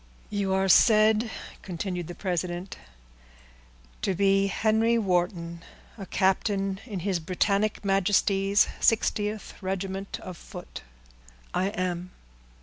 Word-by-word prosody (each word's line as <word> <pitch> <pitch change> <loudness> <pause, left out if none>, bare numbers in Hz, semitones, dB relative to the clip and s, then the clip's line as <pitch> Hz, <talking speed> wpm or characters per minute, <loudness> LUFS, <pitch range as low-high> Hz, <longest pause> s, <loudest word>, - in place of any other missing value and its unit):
"You 200 -2 -1
are 190 0 +2
said," 215 +3 +5 0.3
continued 180 -1 -4
the 175 - -7
president, 180 0 -3 1.3
"to 190 - 0
be 195 +1 +3
Henry 220 +3 +2
Wharton, 175 -4 -1 0.3
a 195 -4 -8
captain 195 0 +1
in 200 -6 -4
his 190 -1 0
Britannic 200 +5 0
Majesty's 195 +1 +3
60th 215 -1 +1
regiment 195 +1 -4
of 180 -2 -7
foot." 175 - -9 0.7
"I 185 - +1
am." 185 -3 -3
195 Hz, 105 wpm, -27 LUFS, 180-205 Hz, 1.3 s, said